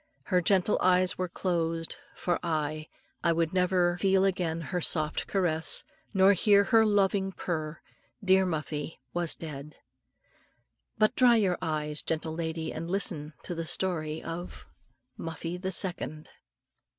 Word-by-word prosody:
Her 180 +4 +1
gentle 190 +2 +2
eyes 185 0 +3
were 185 -1 -1
closed 165 -2 -2 0.2
for 175 -1 -1
aye! 155 -2 -2 0.4
I 170 - +3
would 165 0 0
never 180 -1 +2
feel 195 0 +3
again 175 -4 -1
her 175 +3 -3
soft 155 -1 +1
caress, 170 -5 +1 0.3
nor 195 0 +5
hear 200 +1 +4
her 225 +1 +4
low 205 -1 +4
loving 195 0 -1
purr 155 -4 -4 0.5
dear 190 0 +5
Muffie 155 -2 -4 0.2
was 175 -2 0
dead. 150 -2 -8 1.2
But 215 +2 +3
dry 245 -2 +6
your 195 -5 +1
eyes, 150 -1 -2
gentle 160 0 -2
lady, 160 -1 -3
and 165 +2 -5
listen 170 -6 -1
to 180 - -4
the 165 -1 -4
story 160 -3 0
of 170 +2 -7 0.5
MUFFIE 165 +1 -5
THE 190 +1 -4
SECOND. 170 -4 -1
175 Hz, 140 wpm, -29 LUFS, 160-190 Hz, 1.2 s, dry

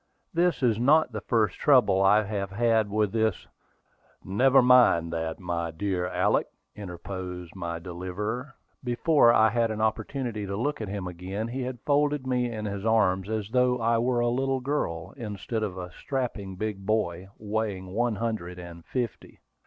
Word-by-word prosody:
"This 170 -4 +1
is 115 -3 +3
not 145 +4 +4
the 110 -2 -5
first 110 -6 +1
trouble 125 -10 +4
I 105 +2 +5
have 100 -2 -3
had 110 +1 +2
with 105 -1 +1
this 110 -3 0 0.4
" - - -36 0.2
"Never 135 0 +7
mind 120 -10 +5
that, 80 -1 -3
my 85 -2 -2
dear 90 +1 -2
Alick," - - +1 0.3
interposed 90 -2 -7
my 85 -2 -4
deliverer. 95 - -5 0.3
Before 125 +1 +4
I 110 -1 +5
had 115 -1 +1
an 110 -1 -4
opportunity 110 0 -2
to 100 +1 -3
look 145 +3 -2
at 110 - -4
him 100 -1 -4
again, 95 +5 -5
he 130 +2 -4
had 125 -2 -5
folded 145 -1 +1
me 125 -2 0
in 110 -2 -5
his 100 -1 -4
arms 100 -4 +2
as 110 -2 -2
though 125 0 +3
I 115 0 +2
were 120 0 +1
a 120 - +2
little 135 +2 0
girl, 100 - -3
instead 110 -1 -4
of 100 -4 -3
a 90 -1 -6
strapping 110 -5 -4
big 105 0 -4
boy, 95 -4 -1
weighing 105 -3 -3
one 120 +1 +1
hundred 100 -5 -3
and 85 -1 -10
fifty. 120 -5 -4
110 Hz, 170 wpm, -27 LUFS, 95-120 Hz, 0.4 s, Never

